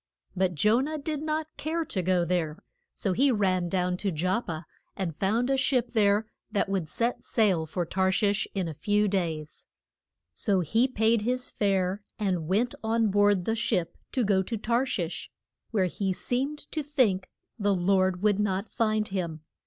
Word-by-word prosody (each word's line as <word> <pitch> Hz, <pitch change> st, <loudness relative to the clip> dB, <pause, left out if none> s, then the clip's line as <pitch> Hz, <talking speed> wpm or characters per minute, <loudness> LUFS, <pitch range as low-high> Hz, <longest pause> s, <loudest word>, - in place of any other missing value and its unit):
But 185 Hz, -1 st, +1 dB
Jo 210 Hz, -, +4 dB
nah 305 Hz, +4 st, -2 dB
did 300 Hz, 0 st, -3 dB
not 310 Hz, 0 st, -1 dB
care 325 Hz, +1 st, -2 dB
to 190 Hz, -, -1 dB
go 180 Hz, -1 st, +2 dB
there, 170 Hz, -3 st, -1 dB, 0.4 s
so 195 Hz, -4 st, 0 dB
he 270 Hz, +7 st, +3 dB
ran 185 Hz, -5 st, +1 dB
down 180 Hz, 0 st, 0 dB
to 195 Hz, +1 st, -1 dB
Jop 185 Hz, +8 st, -1 dB
pa 160 Hz, 0 st, -4 dB, 0.3 s
and 175 Hz, -5 st, -2 dB
found 220 Hz, +8 st, +1 dB
a 270 Hz, 0 st, +2 dB
ship 255 Hz, -2 st, +1 dB
there 210 Hz, -1 st, +3 dB, 0.3 s
that 205 Hz, -, +1 dB
would 190 Hz, -5 st, -2 dB
set 235 Hz, +6 st, -1 dB
sail 190 Hz, -8 st, +2 dB
for 175 Hz, +2 st, -2 dB
Tar 190 Hz, +2 st, +1 dB
shish 205 Hz, +2 st, +1 dB
in 190 Hz, -3 st, 0 dB
a 160 Hz, -, -4 dB
few 210 Hz, +7 st, +1 dB
days. 165 Hz, -6 st, -3 dB, 0.7 s
So 195 Hz, -5 st, +1 dB
he 225 Hz, -, +2 dB
paid 225 Hz, -2 st, +2 dB
his 250 Hz, +3 st, -1 dB
fare, 195 Hz, -1 st, 0 dB, 0.2 s
and 185 Hz, -7 st, -1 dB
went 220 Hz, +7 st, +1 dB
on 225 Hz, 0 st, +2 dB
board 205 Hz, -2 st, +3 dB
the 225 Hz, -, +1 dB
ship 190 Hz, -6 st, -1 dB, 0.2 s
to 255 Hz, -, +1 dB
go 195 Hz, -2 st, +3 dB
to 225 Hz, +4 st, -3 dB
Tar 235 Hz, +5 st, +1 dB
shish, 175 Hz, -8 st, -3 dB, 0.4 s
where 200 Hz, -5 st, +2 dB
he 190 Hz, +1 st, -1 dB
seemed 265 Hz, +9 st, -1 dB
to 310 Hz, -, -1 dB
think 255 Hz, -11 st, +1 dB, 0.3 s
the 200 Hz, -1 st, +2 dB
Lord 185 Hz, 0 st, +2 dB
would 210 Hz, -1 st, +3 dB
not 200 Hz, 0 st, 0 dB
find 215 Hz, -2 st, +1 dB
him. 170 Hz, -5 st, -3 dB
200 Hz, 180 wpm, -28 LUFS, 185-230 Hz, 0.7 s, Jo